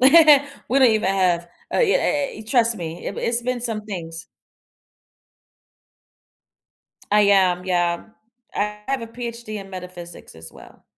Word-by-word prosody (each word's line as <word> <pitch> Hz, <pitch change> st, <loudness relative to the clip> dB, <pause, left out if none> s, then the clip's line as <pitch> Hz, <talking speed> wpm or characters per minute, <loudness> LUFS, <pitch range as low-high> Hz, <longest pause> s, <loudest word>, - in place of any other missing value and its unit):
We 260 Hz, +2 st, +7 dB, 0.7 s
don't -, -, +4 dB
even 215 Hz, -3 st, +1 dB
have 175 Hz, -2 st, +1 dB, 0.2 s
Uh, -, -, 0 dB
yeah, 450 Hz, +1 st, +4 dB
eh 290 Hz, -, 0 dB
eh, -, -, -10 dB
e -, -, -8 dB
trust 230 Hz, -1 st, +2 dB
me. 165 Hz, -1 st, -7 dB
It 195 Hz, -, -4 dB
wa -, -, -4 dB
It's 235 Hz, 0 st, 0 dB
been 250 Hz, 0 st, -2 dB
some 225 Hz, -3 st, -3 dB
things. 165 Hz, -4 st, -6 dB, 2.9 s
I 210 Hz, 0 st, +5 dB
am, 185 Hz, -3 st, +3 dB
yeah. 175 Hz, -2 st, 0 dB, 0.5 s
I 210 Hz, 0 st, -2 dB
have 270 Hz, -1 st, 0 dB
a -, -, -5 dB
PhD 235 Hz, -2 st, -7 dB
in 195 Hz, 0 st, -12 dB
metaphysics, 180 Hz, -, -10 dB
as 80 Hz, 0 st, -11 dB
well. -, -, -16 dB
205 Hz, 155 wpm, -22 LUFS, 175-235 Hz, 2.9 s, We